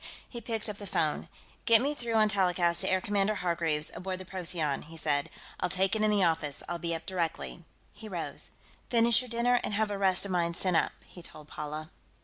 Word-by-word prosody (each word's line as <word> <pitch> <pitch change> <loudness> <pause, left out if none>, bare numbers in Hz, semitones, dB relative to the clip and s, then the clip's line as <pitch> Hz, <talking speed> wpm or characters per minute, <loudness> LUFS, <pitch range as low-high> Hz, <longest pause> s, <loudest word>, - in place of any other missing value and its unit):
He 235 - -8
picked 225 -1 -2
up 210 -2 -4
the 205 - -7
phone. 155 -3 0 0.4
"Get 230 -1 +7
me 280 +4 0
through 235 -5 -3
on 215 -1 +5
telecast 180 -4 +2
to - - +2
Air 185 0 +2
Commodore 205 +1 +1
Hargreaves, 165 -4 0
aboard 185 0 -4
the 185 - -9
Procyon," 170 -6 -1
he 165 +2 -11
said. 145 -2 +1 0.3
"I'll 180 - 0
take 190 +3 +2
it 215 - 0
in 215 - +4
the 205 -2 +3
office; 160 -4 0
I'll 175 0 -3
be 170 -1 -1
up 160 0 -7
directly." 160 - -3 0.3
He 215 +1 -10
rose. 175 -4 -4 0.4
"Finish 235 0 +4
your 250 - -9
dinner, 240 +1 +2
and 210 - -1
have 215 0 +1
the 200 -1 -3
rest 190 -1 +3
of 200 - -4
mine 170 -1 +1
sent 185 -1 +1
up," - - +3
he 175 - -13
told 155 -3 -10
Paula. 150 +1 -6
185 Hz, 220 wpm, -30 LUFS, 165-210 Hz, 0.4 s, Get